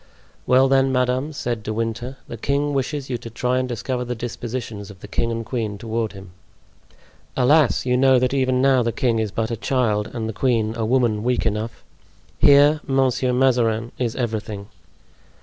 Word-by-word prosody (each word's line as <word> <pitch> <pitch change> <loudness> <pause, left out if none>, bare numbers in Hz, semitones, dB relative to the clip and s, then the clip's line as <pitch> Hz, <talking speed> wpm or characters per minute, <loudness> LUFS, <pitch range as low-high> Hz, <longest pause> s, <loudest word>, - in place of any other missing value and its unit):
"Well, 130 +1 +5
then, 135 0 +3
madame," 125 +3 0
said 120 -6 -3
De 110 - -5
Winter, 115 +4 -3
"the - - -6
king 140 +5 -1
wishes 140 +1 -2
you 120 - -2
to 115 - -8
try 125 +2 0
and 130 0 -2
discover 125 +2 -3
the 125 0 -4
dispositions 115 -3 -5
of 95 -2 -13
the - - -9
king 115 +2 -1
and 115 0 -3
queen 110 -5 -3
toward 110 0 -3
him." 95 -2 -11 1.1
"Alas! 140 +1 +3
you 125 -1 +2
know 130 0 +5
that 125 +1 +1
even 130 -1 +1
now 135 -2 +4
the 115 0 0
king 115 -1 0
is 110 -1 -1
but 110 +3 -2
a - - -1
child 110 -3 0
and 110 -2 -4
the 110 - -4
queen 110 -2 +1
a 115 -1 -2
woman 120 -4 +2
weak 125 0 0
enough. 110 +1 -3 0.6
Here, 145 +2 +6
Monsieur 130 -2 +1
Mazarin 120 -3 +2
is 120 -3 -1
everything." 110 -4 -4
120 Hz, 185 wpm, -22 LUFS, 110-130 Hz, 1.1 s, Here